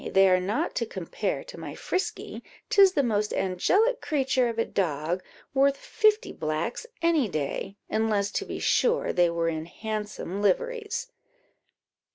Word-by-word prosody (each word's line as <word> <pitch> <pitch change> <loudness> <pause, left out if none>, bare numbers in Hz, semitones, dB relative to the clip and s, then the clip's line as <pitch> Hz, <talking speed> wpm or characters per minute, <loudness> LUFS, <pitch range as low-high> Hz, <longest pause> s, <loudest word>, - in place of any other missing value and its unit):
they 195 0 +6
are 185 -1 +4
not 210 - -1
to - - -1
compare - - -3
to - - -10
my - - -7
Frisky; 370 +2 -3 0.3
'tis 390 -2 +7
the 285 - +2
most 210 -3 0
angelic 390 - +2
creature 265 -5 +1
of 230 - -5
a 230 - +2
dog! 165 0 -1 0.3
worth 275 +1 +3
fifty 430 - +2
blacks 155 - -3 0.2
any 320 -9 +3
day, 155 +6 -3
unless, 215 -2 +1
to - - -1
be - - -5
sure, 485 0 +2
they 175 -1 +4
were 170 0 0
in 160 0 -2
handsome 210 -1 -4
liveries." 485 - 0
220 Hz, 150 wpm, -27 LUFS, -, 0.3 s, tis